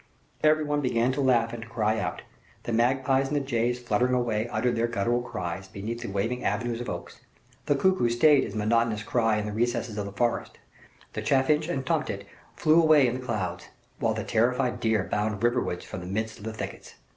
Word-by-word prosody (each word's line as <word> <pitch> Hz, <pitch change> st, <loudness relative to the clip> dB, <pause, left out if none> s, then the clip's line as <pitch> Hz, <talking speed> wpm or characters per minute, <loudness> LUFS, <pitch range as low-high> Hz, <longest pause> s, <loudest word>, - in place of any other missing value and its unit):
Every 155 Hz, 0 st, +4 dB
one 145 Hz, 0 st, 0 dB
began 125 Hz, -1 st, +1 dB
to 140 Hz, -, -1 dB
laugh 120 Hz, -3 st, +2 dB
and 120 Hz, -, -6 dB
to 115 Hz, -, -10 dB
cry 110 Hz, -1 st, 0 dB
out. -, -, -3 dB, 0.4 s
The 120 Hz, -, -3 dB
magpies 130 Hz, +3 st, +2 dB
and 150 Hz, -, -2 dB
the -, -, +3 dB
jays 120 Hz, -3 st, 0 dB
fluttered 120 Hz, +1 st, +1 dB
away 115 Hz, -3 st, 0 dB
uttering 125 Hz, 0 st, 0 dB
their 115 Hz, +1 st, +1 dB
guttural 120 Hz, +2 st, 0 dB
cries, 95 Hz, -5 st, -5 dB
beneath 105 Hz, +5 st, -5 dB
the 120 Hz, -, -5 dB
waving 110 Hz, +6 st, -2 dB
avenues 115 Hz, +3 st, -1 dB
of 120 Hz, -, -5 dB
oaks; 85 Hz, 0 st, -7 dB, 0.5 s
the 145 Hz, -, +3 dB
cuckoo 185 Hz, -4 st, +2 dB
staid 135 Hz, +4 st, +5 dB
his 100 Hz, -, -6 dB
monotonous 110 Hz, 0 st, +1 dB
cry 115 Hz, -2 st, +1 dB
in 105 Hz, -, -2 dB
the 105 Hz, -, -3 dB
recesses 120 Hz, -1 st, -1 dB
of 100 Hz, -, -2 dB
the -, -, -7 dB
forest; 120 Hz, +4 st, -1 dB, 0.6 s
the -, -, -3 dB
chaffinch 150 Hz, +3 st, +2 dB
and 135 Hz, -6 st, -2 dB
tomtit -, -, -1 dB, 0.3 s
flew 160 Hz, +2 st, +4 dB
away 155 Hz, -4 st, +6 dB
in 125 Hz, +1 st, -1 dB
clouds; 110 Hz, -7 st, -3 dB, 0.3 s
while -, -, +1 dB
the -, -, -3 dB
terrified 125 Hz, +2 st, +1 dB
deer 110 Hz, -3 st, +1 dB
bounded 105 Hz, +1 st, -2 dB
riverwards 120 Hz, -7 st, 0 dB
from -, -, -6 dB
the 90 Hz, -, -8 dB
midst 110 Hz, +3 st, -3 dB
of 105 Hz, -, -10 dB
the 110 Hz, -, -4 dB
thickets. 110 Hz, -, -7 dB
120 Hz, 205 wpm, -27 LUFS, 110-130 Hz, 0.6 s, away